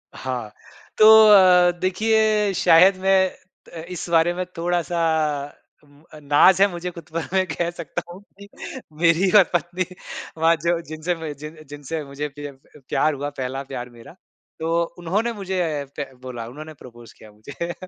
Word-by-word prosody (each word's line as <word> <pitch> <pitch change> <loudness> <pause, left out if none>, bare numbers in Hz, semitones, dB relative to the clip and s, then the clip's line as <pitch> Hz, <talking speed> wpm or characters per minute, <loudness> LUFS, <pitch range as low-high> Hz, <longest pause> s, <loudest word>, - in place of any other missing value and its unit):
हाँ, 125 -5 -5 0.5
तो 215 - +6 0.2
अ, 185 -3 +6
देखिए 215 +2 +1
शायद 185 +2 +5
मैं 190 0 +3 0.4
त 165 -1 -9
इस 180 -1 -6
बारे 170 +1 +3
में 185 +1 -4
थोड़ा-सा 175 0 -1 0.9
उम, 145 0 -23
अ 155 - -11
नाज़ 150 +6 +4
है 200 - +7
मुझे 175 +1 -5
खुद 165 -4 -13
पर 165 -1 -3
मैं 190 0 +2
कह 170 +2 -2
सकता 170 -3 -6
हूँ 180 +3 -11 0.2
कि 200 - -12 0.5
मेरी 170 +3 +3
और 200 - +8
पत्नी 175 +1 -1 0.5
वहाँ 165 +1 +3
जो 170 0 +1
जिनसे 155 +3 -3
मुझे 160 -3 -6
जिन 150 +3 -10
जिनसे 145 +2 -6
मुझे 140 +2 -5
पि 145 - -8
अप 135 -2 -14 0.2
प 150 - -16
प्यार 155 0 +1
हुआ 145 +1 -4
पहला 135 +1 -4
प्यार 125 -2 -7
मेरा। 120 +5 -15 0.5
तो 165 +1 0 0.2
उन्होंने 210 +8 -1
मुझे 190 -2 -5
ए, 155 -4 -2
ए 140 - -7
पै 140 -3 -5
बोला। 120 -3 -7
उन्होंने 155 +6 -10
प्रपोज़ 120 -5 -15
किया 110 - -15
मुझे। 145 +11 -7
165 Hz, 175 wpm, -22 LUFS, 145-180 Hz, 0.9 s, और